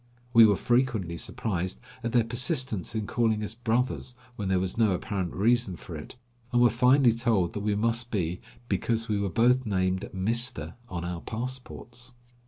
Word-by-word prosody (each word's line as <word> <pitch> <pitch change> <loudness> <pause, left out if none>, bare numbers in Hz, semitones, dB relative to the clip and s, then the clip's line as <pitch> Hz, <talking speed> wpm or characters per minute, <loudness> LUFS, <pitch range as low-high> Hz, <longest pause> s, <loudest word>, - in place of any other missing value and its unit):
We 115 -2 +9
were 105 - +3
frequently 120 -7 0
surprised 90 - -3 0.2
at 115 - -2
their 120 -1 +4
persistence 120 - 0
in 110 -1 -1
calling 110 -1 0
us 105 - -4
brothers 120 +2 -1 0.2
when 100 -4 -4
there 95 0 +2
was 95 0 -2
no 110 -4 +3
apparent 95 -1 -3
reason 115 -1 +1
for 85 - -9
it, 75 - -9 0.4
and 120 - +2
were 120 -2 +5
finally 125 +1 +4
told 115 -7 +1
that - - -3
we 105 0 0
must 115 +2 0
be 90 -5 -2 0.3
"because 115 -1 -1
we 105 -2 0
were 100 - -1
both 125 +6 +3
named 95 -2 0
Mister 115 +6 0 0.2
on 85 -1 -4
our 85 -1 -4
passports." 125 +1 -7
115 Hz, 175 wpm, -27 LUFS, 95-120 Hz, 0.4 s, We